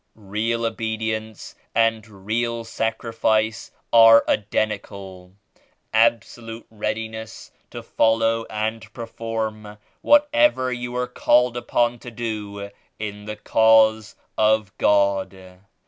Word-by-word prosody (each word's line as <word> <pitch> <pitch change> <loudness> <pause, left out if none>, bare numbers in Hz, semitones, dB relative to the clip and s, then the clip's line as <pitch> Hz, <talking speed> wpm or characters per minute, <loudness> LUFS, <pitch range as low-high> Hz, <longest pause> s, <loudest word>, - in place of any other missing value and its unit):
"Real 110 +3 -2
obedience 110 -1 -4 0.2
and 115 -1 +1 0.2
real 115 +2 -1
sacrifice 110 -1 -1 0.2
are 115 0 +8
identi 105 0 0
cal 95 -3 -12 0.3
— - - -36 0.3
absolute 115 0 0
readiness 110 +1 -5 0.2
to - - -9
follow 115 0 +1
and 110 +1 -4
perform 110 -2 -5 0.2
whatever 295 - +3
you 120 0 -5
are 125 0 0
called 125 0 +2
upon 120 0 0
to 120 - -9
do 105 -3 -6 0.3
in 105 -1 -6
the 105 0 -5
Cause 110 0 +3 0.2
of 110 -2 +2
God. 95 -2 0
110 Hz, 100 wpm, -22 LUFS, 105-115 Hz, 0.3 s, are